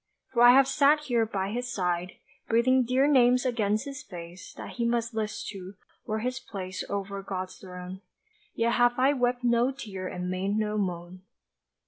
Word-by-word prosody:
For 235 - +2
I 240 0 +9
have 270 0 +6
sat 285 +2 +4
here 240 -6 +1
by 195 -2 -2
his 245 +2 -3
side, 180 -3 -1 0.3
Breathing 255 +3 +3
dear 255 +3 +2
names 250 -3 +4
against 215 -1 0
his 275 -2 -7
face, 175 -6 -10
That - - -8
he 235 - 0
must 235 0 -1
list 215 -1 -3
to, 195 -1 -9 0.3
were 215 - -1
his 250 +2 -2
place 185 -7 -6
Over 200 0 -3
God's 185 -1 -5
throne 180 0 -9 0.5
Yet 230 +1 +1
have 245 0 +3
I 265 +3 +4
wept 245 -2 0
no 240 +1 +3
tear 205 -9 -6
and 180 0 -5
made 190 +3 -1
no 215 -1 -1
moan. 180 -1 -4
220 Hz, 175 wpm, -28 LUFS, 190-250 Hz, 0.5 s, I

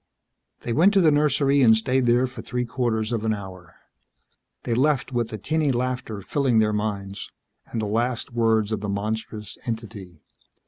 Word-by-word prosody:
They 120 - -3
went 185 - +4
to 195 - +6
the 160 -3 +5
nursery 145 -1 +3
and 110 -3 +6
stayed 125 +2 +1
there 120 +2 +4
for 130 - -7
three 125 0 -3
quarters 115 -2 -1
of 115 -2 -1
an 110 -1 +1
hour. 95 -4 -10 0.9
They 120 - -1
left 135 0 +1
with 120 -2 0
the 110 - -5
tinny 155 +6 0
laughter 125 -4 -3
filling 135 -2 +1
their 105 -1 +3
minds 100 -2 -3 0.4
and 115 - -4
the 110 - -1
last 120 +3 -1
words 110 -2 +2
of 110 - -2
the 105 - -3
monstrous 105 +1 -4
entity. 105 -7 -6
115 Hz, 175 wpm, -24 LUFS, 105-130 Hz, 0.9 s, to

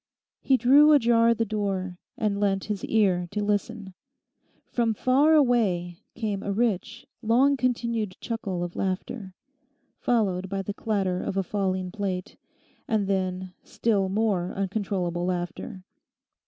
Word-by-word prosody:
He 265 - +3
drew 285 +5 +6
ajar 235 -3 +4
the 230 - 0
door, 195 -4 -3 0.2
and 205 -2 0
leant 195 -1 +1
his 210 -2 -4
ear 190 -5 +2
to 205 +2 -2
listen. 205 -1 -2 0.7
From 230 -2 0
far 280 +8 +4
away 200 - +2 0.2
came 210 -4 -2
a 200 - -3
rich, 225 +1 -1 0.2
long 250 +5 +3
continued 235 -5 -1
chuckle 200 -6 -3
of 175 0 -6
laughter, 190 +1 -4 0.6
followed 190 -6 0
by 195 0 -2
the 205 - -4
clatter 195 -4 -1
of 195 - -3
a 195 - +2
falling 185 -1 -2
plate, 190 -3 -4 0.5
and 215 -3 +1
then, 185 -1 -2
still 200 -4 0
more 195 -3 0
uncontrollable 190 -3 -2
laughter. 185 +2 -4
200 Hz, 130 wpm, -26 LUFS, 185-230 Hz, 0.7 s, drew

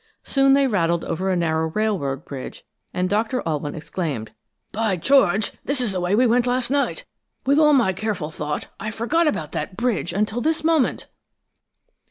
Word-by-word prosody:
Soon 275 -1 +3
they 275 0 +4
rattled 170 -8 +1
over 185 +4 -2
a 185 - +2
narrow 160 -2 0
railroad 160 -9 -1
bridge, 135 -2 -8 0.3
and 180 0 -1
Doctor 220 +6 0
Alwyn 150 -2 -2
exclaimed: 150 - -4 0.4
"By 220 -2 0
George! 205 - +3
This 280 -1 -1
is 245 -5 0
the 185 - -2
way 180 +3 +1
we 250 +4 +4
went 245 +1 +3
last 250 0 0
night! 285 - 0 0.4
With 280 +3 +4
all 300 -1 +6
my 235 -9 +3
careful 185 -6 -3
thought, 150 -1 -4
I 215 - -3
forgot 270 +10 +1
about 160 - -1
that 185 - -4
bridge 235 -7 0
until 215 +4 -1
this 315 +2 0
moment!" 320 -4 +2
210 Hz, 175 wpm, -22 LUFS, 165-255 Hz, 0.4 s, all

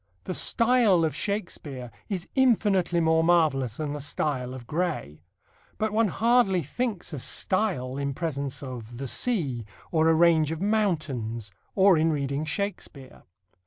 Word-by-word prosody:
The - - -4
style 230 -8 +3
of 155 - -2
Shakespeare 150 - -4 0.2
is 190 -4 -3
infinitely 205 -9 +2
more 160 0 +3
marvellous 150 -9 +2
than 150 -2 -3
the 150 - -5
style 135 -3 -2
of 125 -2 -10
Gray. 150 - -3 0.6
But 220 -1 -1
one 225 0 +3
hardly 220 -4 +2
thinks 210 - -3
of 140 - -5
style 175 - -1
in 140 -1 -2
presence 140 -5 -3
of 120 -3 -8
the 135 - -5
sea 140 - 0 0.3
or 160 -1 +3
a 165 - +4
range 160 -2 +4
of 160 - -4
mountains 155 - -1 0.2
or 190 -4 +5
in 160 +1 +2
reading 140 0 -2
Shakespeare. 150 -6 -5
160 Hz, 145 wpm, -26 LUFS, 135-195 Hz, 0.6 s, or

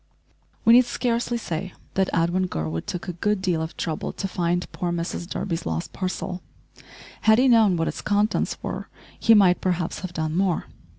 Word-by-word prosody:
We 230 - +8
need 250 +1 +7
scarcely 240 0 -1
say 180 -4 -4 0.2
that 190 -1 +1
Edwin 175 +3 +1
Gurwood 80 - -3
took 180 - -4
a 180 - -3
good 205 +4 0
deal 180 -4 0
of 160 +1 -5
trouble 160 -3 -3
to 195 - -4
find 175 -1 0
poor 175 -1 -2
Mrs 170 0 -3
Durby's 170 -4 -3
lost 80 0 -3
parcel. 185 -1 -3 0.8
Had 220 0 +5
he 260 +2 +4
known 220 -7 +5
what 165 - 0
its - - -4
contents 205 +1 +1
were - - -5 0.3
he 225 - +6
might 185 -4 +5
perhaps 180 -2 -1
have 185 -2 -6
done 160 -1 -2
more. 185 -2 +1
180 Hz, 180 wpm, -24 LUFS, 170-205 Hz, 0.8 s, We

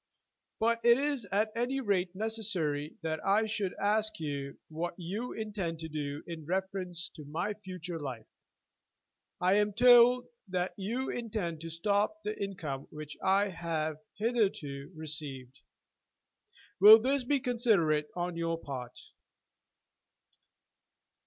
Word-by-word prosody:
"But 230 +1 +2
it 235 0 +7
is 280 -6 -1
at 215 +2 +2
any 245 +4 0
rate 190 -6 0
necessary 185 -9 -2
that 160 -1 -2
I 205 +3 +3
should 205 -4 -2
ask 215 +1 +1
you 140 -3 -4
what 170 +2 -4
you 200 +8 -4
intend 205 -7 -3
to 160 - -4
do 145 -1 -4
in 165 -2 -7
reference 185 0 -2
to 155 - -10
my 170 +8 -2
future 180 -4 -7
life. 130 -6 -6 1.1
I 185 +3 +4
am 210 0 +2
told 245 +2 +7 0.2
that 180 -1 -1
you 230 +7 -2
intend 205 -9 -3
to 165 - -6
stop 205 - 0
the 210 +1 -2
income 155 -9 -5
which 150 -1 -8
I 195 +2 +3
have 160 -3 -2 0.2
hitherto 195 - -1
received. 145 -5 -5 1.2
Will 210 +3 +11
this 265 +3 +1
be 280 +3 +2
considerate 205 - +2
on 175 0 -2
your 165 0 -1
part?" 130 -6 -7
185 Hz, 125 wpm, -31 LUFS, 160-220 Hz, 1.2 s, Will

